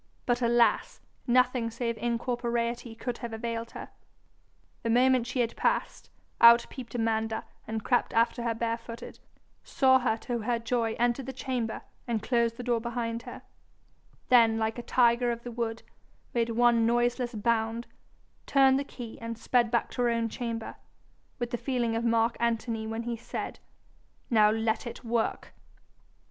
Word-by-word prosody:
But 245 0 +1
alas! 235 0 +2 0.3
nothing 250 -1 +3
save 230 0 -3
incorporeity 235 0 -2
could 240 +1 -4
have 235 -2 -6
availed 230 0 -4
her. - - -8 0.9
The 230 - -2
moment 250 +1 +4
she 250 +1 0
had 230 -1 -1
passed, - - -1 0.3
out 235 0 +8
peeped 245 -2 -8
Amanda 225 -1 0 0.2
and 220 -1 -3
crept 245 - +1
after 230 +1 +2
her 235 -1 -1
barefooted, 230 +1 -5 0.4
saw 260 -1 +4
her 245 -3 0
to 240 -1 -3
her 235 +2 0
joy 230 -1 -1
enter 240 +2 +1
the 265 +1 -6
chamber 250 -3 -3 0.2
and 225 -3 -1
close 235 -1 +1
the 245 - -8
door 240 -2 0
behind 235 -1 -3
her, - - -10 0.9
then 230 -3 +6
'like 220 +1 -1
a - - -3
tiger 240 0 +3
of 235 0 -5
the 245 - -6
wood,' 230 -1 -3 0.5
made 235 -1 +1
one 230 0 +3
noiseless 240 +1 +1
bound, 225 +1 0 0.6
turned 270 -1 +5
the - - -1
key, 240 -5 -9
and 230 0 -5
sped 235 0 +2
back 235 0 0
to 245 - -3
her 240 - +3
own 230 -1 0
chamber 230 -2 -5 0.6
with 240 -1 -3
the 240 - -1
feeling 240 -3 -1
of 230 - -1
Mark 230 0 +2
Antony 230 -1 -1
when 225 +1 -3
he 235 0 -3
said, 225 - -6 0.7
'Now 215 -2 +6
let 220 +2 0
it 235 - -8
work!' 230 -1 -2
235 Hz, 160 wpm, -28 LUFS, 230-245 Hz, 0.9 s, out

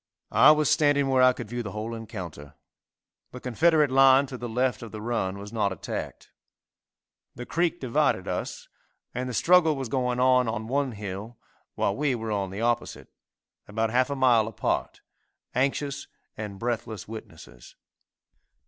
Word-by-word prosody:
I 115 +7 +7
was 155 -1 +4
standing 145 -2 +3
where 130 -1 +3
I 130 0 +7
could 125 - -7
view 120 +2 -4
the 105 -4 -6
whole 110 +2 -4
encounter. 90 -11 -8 0.7
The 125 - -9
Confederate 150 +4 +2
line 135 +1 +6
to 130 - -8
the 120 - -5
left 125 0 0
of 115 - -8
the 110 - -7
run 105 -4 -2
was 100 +2 -9
not 105 -3 +1
attacked. 95 - -6 1.0
The 120 - -7
creek 170 +3 0
divided 125 -3 +1
us, - - -4 0.5
and 125 +1 -3
the - - -5
struggle 165 -1 +4
was 135 -3 -4
going 125 0 -1
on 125 -1 +4
on 110 -1 -3
one 135 +1 -1
hill 105 +3 -7 0.4
while 100 - 0
we 140 -3 0
were 110 -1 -4
on 100 -2 -1
the 100 +3 -6
opposite, 120 0 -1 0.6
about 110 +1 -1
half 130 +3 +2
a 140 - -2
mile 120 -5 +4
apart, 110 - -2 0.5
anxious 140 +2 -1 0.3
and 105 -2 -6
breathless 110 -2 -4
witnesses. 80 - -11
120 Hz, 160 wpm, -26 LUFS, 110-135 Hz, 1.0 s, I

